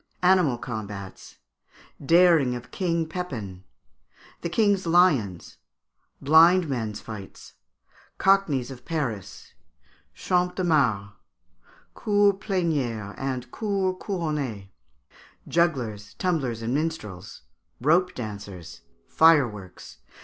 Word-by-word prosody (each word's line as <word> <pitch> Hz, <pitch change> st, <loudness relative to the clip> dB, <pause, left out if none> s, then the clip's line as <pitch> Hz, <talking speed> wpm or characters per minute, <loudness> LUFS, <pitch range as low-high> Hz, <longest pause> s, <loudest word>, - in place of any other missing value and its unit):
Animal 180 Hz, -9 st, +4 dB
Combats. 105 Hz, -5 st, -7 dB, 0.7 s
Daring 165 Hz, -5 st, +4 dB
of 120 Hz, 0 st, -9 dB
King 170 Hz, -3 st, -1 dB
Pepin. 115 Hz, -, -6 dB, 0.8 s
The 170 Hz, -, -3 dB
King's 200 Hz, -1 st, +1 dB
Lions. 145 Hz, -, +2 dB, 0.6 s
Blind 165 Hz, +4 st, +5 dB
Men's 115 Hz, -6 st, -3 dB
Fights. 105 Hz, -4 st, -10 dB, 0.6 s
Cockneys 170 Hz, -10 st, +2 dB
of 125 Hz, -2 st, -11 dB
Paris. 125 Hz, -, -5 dB, 0.6 s
Champ 180 Hz, 0 st, 0 dB
de 185 Hz, -, -2 dB
Mars. 120 Hz, -, +1 dB, 0.8 s
Cours 205 Hz, -1 st, +3 dB
Plénières 145 Hz, -, -2 dB
and 130 Hz, -2 st, -4 dB
Cours 195 Hz, -4 st, -1 dB
Couronnées. 150 Hz, -, -3 dB, 0.8 s
Jugglers, 120 Hz, -, -1 dB
Tumblers, 135 Hz, -11 st, -1 dB
and 115 Hz, +2 st, -2 dB
Minstrels. 135 Hz, -, -4 dB, 0.4 s
Rope 170 Hz, +7 st, +2 dB
dancers. 100 Hz, -7 st, -8 dB, 0.3 s
Fireworks. 125 Hz, -, +2 dB
140 Hz, 90 wpm, -25 LUFS, 110-175 Hz, 0.8 s, Blind